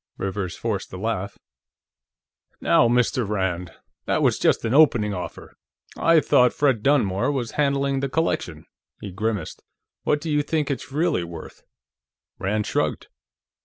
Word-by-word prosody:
Rivers 95 -2 -3
forced 110 -4 -3
a - - -5
laugh. 100 -1 -3 1.2
"Now, - - +4
Mr. 120 -2 +1
Rand! 95 -4 -2 0.3
That - - 0
was - - +2
just - - +2
an 115 - 0
opening 120 -8 +4
offer. 90 -2 -7 0.4
I 165 -1 +4
thought 125 -3 +4
Fred 135 -7 +1
Dunmore 110 -5 +2
was 125 -5 -3
handling 140 -1 0
the 135 0 -2
collection." 160 +5 -2 0.3
He 100 - -7
grimaced. 105 -2 -3 0.4
"What 150 - +1
do 160 +1 -4
you 150 0 +2
think 150 0 -1
it's 140 0 -5
really 155 - +1
worth?" 85 -2 -10 0.8
Rand 105 +2 -1
shrugged. - - -2
115 Hz, 140 wpm, -23 LUFS, 100-145 Hz, 1.2 s, Now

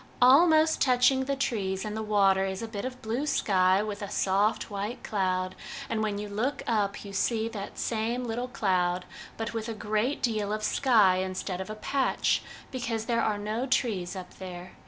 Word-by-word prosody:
Almost 315 +5 +6
touching 260 +1 +4
the 275 +1 -1
trees 200 -8 -1
in 210 - -4
the 220 - -3
water 200 -3 +3
is 190 +2 -3
a - - -3
bit 210 -1 -5
of 255 0 -6
blue 235 +7 -2
sky 190 -7 +3
with 210 0 -5
a 205 - -4
soft 205 +3 +1
white 205 +5 -4
cloud; 185 -2 -1 0.4
and 225 -1 0
when 210 -2 -1
you 210 0 -4
look 220 +8 -2
up 205 -3 0
you 200 - -8
see 220 +3 0
that 205 -3 -7
same 235 +2 -1
little 240 +1 -3
cloud, 185 -7 0 0.3
but 225 +1 -3
with 225 0 -3
a 225 - -4
great 215 +6 -1
deal 215 -4 0
of 215 0 -2
sky 215 -8 +4
instead 185 0 -3
of 190 - -7
a 215 - -5
patch, 265 +5 +1 0.3
because 230 -3 -3
there 230 -1 +1
are 215 -2 +1
no 215 +5 -2
trees 210 -8 0
up 185 -1 -9
there. 180 -1 -8
215 Hz, 190 wpm, -28 LUFS, 195-240 Hz, 0.4 s, Almost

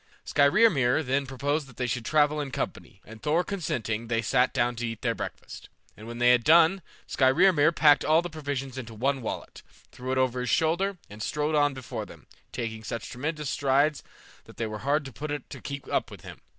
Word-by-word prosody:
Skrymir 145 - +3
then 135 +1 0
proposed 140 +3 -2
that 120 -4 -17
they 125 - -1
should 120 -1 -3
travel 150 +1 +2
in 140 - -4
company, 95 -6 -5
and 110 0 -12
Thor 160 +4 +1
consenting, 115 - -3
they 115 0 0
sat 125 +3 +2
down 120 0 0
to 120 0 -2
eat 115 -1 -7
their - - +1
breakfast, - - -8 0.3
and 110 - -12
when 120 0 -7
they 120 0 +5
had 125 -1 +4
done, 170 +5 +5 0.2
Skrymir 155 +4 +4
packed 150 -3 +5
all 160 +2 +3
the - - -3
provisions 140 -5 -5
into 115 -3 -8
one 135 +4 0
wallet, 110 - -6 0.3
threw 130 +1 -6
it 130 - 0
over 130 -1 +1
his 125 -1 -2
shoulder, 170 - +1
and 105 +1 -11
strode 150 +8 -1
on 145 -2 +2
before 130 -3 -6
them, - - -15 0.3
taking 115 -2 -5
such 115 +1 -5
tremendous 150 +2 -3
strides 140 +2 +2 0.4
that - - -16
they 115 - -2
were 110 -1 -5
hard 145 +3 0
put 150 - -6
to 145 - -2
it 145 - -9
to - - -8
keep 140 -1 -7
up - - -1
with - - -11
him. - - -11
135 Hz, 210 wpm, -27 LUFS, 120-150 Hz, 0.4 s, they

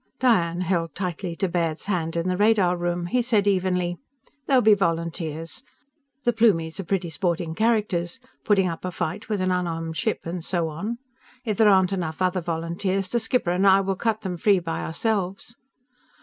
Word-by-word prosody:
Diane 180 -9 +2
held 170 -4 -1
tightly 180 -1 -3
to 195 - 0
Baird's 165 -3 -1
hand, 170 -5 -1
in 170 +1 -1
the 185 - +1
radar 200 -3 +3
room. 175 0 -2
He 245 +8 +1
said 225 -4 +2
evenly: 180 -3 +1 0.5
"There'll 265 -3 +4
be 215 0 +7
volunteers. 165 0 -2 0.6
The 240 - +2
Plumies 195 -7 +2
are - - -2
pretty 180 -2 -2
sporting 170 0 -1
characters 210 -2 0 0.2
putting 195 -3 +3
up 165 -2 -5
a 185 - -2
fight 175 +1 -4
with 210 -3 -1
an 185 0 +1
unarmed 165 -3 -2
ship, 220 - -1
and 170 0 -5
so 170 -2 -1
on. 205 +10 -4 0.5
If 215 -4 -1
there 220 -2 +6
aren't 190 -1 +4
enough 160 -4 -3
other 185 0 +1
volunteers, 175 +4 -2
the 235 - +2
skipper 225 -5 0
and 185 +3 +2
I 195 0 +6
will 195 0 -1
cut 220 +2 -1
them 180 -3 -4
free 200 +3 +4
by 165 -2 -3
ourselves." 195 +4 -2
180 Hz, 180 wpm, -24 LUFS, 170-205 Hz, 0.6 s, be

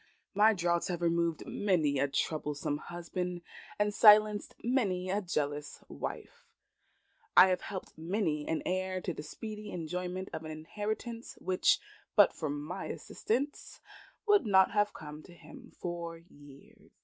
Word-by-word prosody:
My 215 +2 +5
draughts 170 -1 +1
have 175 -1 -3
removed 170 -1 +1
many 160 -9 +1
a 140 - +3
troublesome 145 0 -2
husband, 175 +1 -5 0.3
and 210 0 +1
silenced 210 0 +6
many 195 -7 0
a 205 +2 +1
jealous 150 -5 -3
wife. 480 0 -7 0.9
I 190 - +10
have 185 - +1
helped 190 -2 -7
many 165 -3 -1
an 160 - -1
heir 185 0 -1
to 180 -1 -3
the 150 - -6
speedy 210 +7 -7
enjoyment 180 +2 -4
of 160 - -4
an 155 - -7
inheritance, 215 +9 -5
which, 185 -1 +3 0.4
but - - +7
for 155 - -3
my 150 +6 -4
assistance, 275 +6 -3 0.5
would 410 - +4
not 190 -2 +5
have 205 0 +2
come 150 0 -9
to 175 +2 -15
him 250 +7 -13
for 170 -1 -5
years. 145 -5 -17
180 Hz, 140 wpm, -32 LUFS, 160-210 Hz, 0.9 s, I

